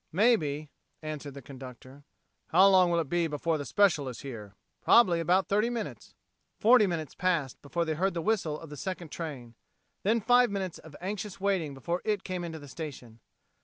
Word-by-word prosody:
"Maybe," 155 - +2 0.3
answered 150 -2 -6
the 140 - -9
conductor. 130 +1 -11 0.4
"How 185 +4 +6
long 185 -2 +5
will 170 -1 +2
it 160 - -1
be 170 +2 +1
before 155 +1 -1
the 145 - -4
special 175 -8 +3
is 125 - -8
here?" 105 -7 -8 0.3
"Probably 185 -8 +5
about 180 +3 +2
thirty 210 +4 +2
minutes." 235 -3 -6 0.4
Forty 230 -1 +6
minutes 160 -5 -3
passed 170 -8 -1
before 170 +4 -2
they 160 - -1
heard 185 +4 0
the 170 - -1
whistle 165 -7 0
of 165 -2 -11
the 150 - -8
second 180 -2 -5
train; 135 -8 -6 0.5
then 220 +4 +2
five 245 +3 +4
minutes 190 -3 -4
of 160 -3 -13
anxious 200 +1 -5
waiting 190 -8 0
before 170 +6 -3
it 210 -3 -1
came 185 -2 -4
into 165 -2 -5
the 145 -2 -11
station. 130 -6 -8
170 Hz, 185 wpm, -29 LUFS, 145-195 Hz, 0.5 s, How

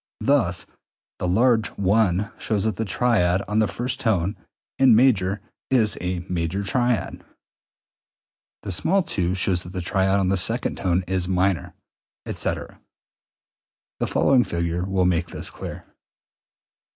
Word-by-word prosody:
Thus 120 -11 +2
e.g., - - -28 0.5
the 90 - -2
large 110 +3 +2
I 100 0 +2
shows 105 -3 -1
that 110 -4 -1
the 115 - -1
triad 100 -4 +1
on 105 +1 0
the 110 - +3
first 125 +4 -3
tone 100 -4 0 0.4
(in 130 -4 +6
major) 105 -5 +3 0.3
is 115 -6 +3
a 90 0 -3
major 90 +2 -2
triad, 120 +1 -1 1.4
the - - -4
small 180 - +2
II 90 -1 0
shows 90 -1 0
that 90 0 -10
the 90 - -3
triad 95 +2 +1
on 95 -1 +1
the 95 - +2
second 90 - +1
tone 90 0 0
is 95 -1 -1
minor, 95 -3 0 0.5
etc. - - -4 1.2
The - - 0
following 130 -3 +3
figure 85 -1 -2
will 95 -1 +1
make 85 -1 +1
this - - -7
clear. - - -8
95 Hz, 140 wpm, -23 LUFS, 90-110 Hz, 1.4 s, in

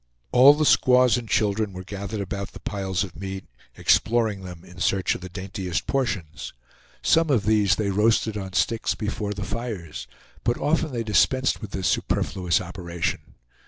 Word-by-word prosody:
All 135 +4 +8
the 155 +1 +1
squaws 125 -3 +5
and 120 -3 -4
children 105 0 +1
were 90 0 -7
gathered 100 +2 -5
about 100 0 -5
the - - -10
piles 95 -2 -2
of 95 -5 -8
meat, 95 +2 -6 0.3
exploring 110 -4 +2
them 90 -2 -10
in 90 0 -14
search 95 0 +1
of - - -7
the 95 - -7
daintiest 95 -3 -4
portions. 110 - -3 0.5
Some 165 -1 +3
of 120 -8 +2
these 105 -2 +3
they 100 -2 -1
roasted 110 +2 +2
on 95 -2 -5
sticks 115 +3 0
before 105 -1 -3
the 105 - -4
fires, 100 - -5 0.4
but 120 0 +1
often 155 +1 0
they 120 -2 -2
dispensed 130 +5 +2
with 105 - -6
this 95 -1 -2
superfluous 90 -3 0
operation. 85 -2 -4
100 Hz, 165 wpm, -24 LUFS, 95-115 Hz, 0.5 s, All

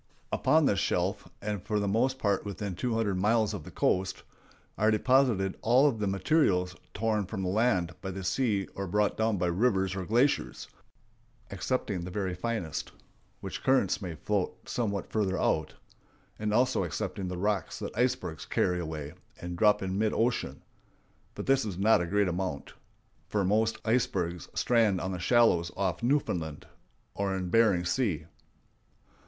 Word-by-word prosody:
Upon - - +3
this - - +2
shelf, - - -1 0.2
and 105 -2 -2
for 105 +3 -1
the 100 - -1
most 125 +6 +1
part 100 -6 0
within 100 -1 -4
two 115 +6 -2
hundred 100 -5 0
miles 110 +2 +2
of 95 -7 -5
the - - -8
coast, 95 0 0 0.5
are 110 +1 +2
deposited 110 -4 +2
all 125 +5 +5
of 120 -6 0
the 105 - 0
materials 95 - +2 0.2
torn 105 -2 0
from 95 -2 -4
the 90 - -1
land 95 -4 +1
by 95 - -4
the 95 0 -5
sea 100 -1 0
or 100 0 -4
brought 105 +3 +1
down 110 -1 +1
by 90 - 0
rivers 95 +1 +1
or 95 - -3
glaciers, 125 +6 +1 0.8
excepting 100 -2 -2
the 90 - -5
very 95 0 -2
finest, 90 -3 -3 0.5
which - - -6
currents 120 -6 +2
may 90 -4 -5
float 100 +4 -2
somewhat 100 -5 -2
farther 100 -4 0
out, 80 - 0 0.6
and 105 0 -1
also 125 +2 +2
excepting 90 +3 -3
the 90 0 -4
rocks 100 -1 -1
that - - -6
icebergs 120 -9 -1
carry 90 -1 +1
away 80 -3 -5 0.3
and 90 0 -5
drop 105 +2 +3
in 95 +1 -2
mid 110 -1 +1
ocean; 120 +2 -1 0.7
but - - -5
this 135 0 +3
is 100 -5 -4
not 105 0 +4
a 85 - -2
great 100 +2 +2
amount, 90 -5 -3 0.5
for 100 -2 0
most 110 +3 +2
icebergs 90 -8 0
strand 110 -6 +3
on 95 +2 -3
the 90 - -4
shallows 90 -4 +3
off 100 +4 -1
Newfoundland 90 - -1 0.5
or 100 -1 -1
in 90 -2 -4
Bering 100 -6 +4
Sea. 90 - 0
100 Hz, 165 wpm, -29 LUFS, 90-115 Hz, 0.8 s, all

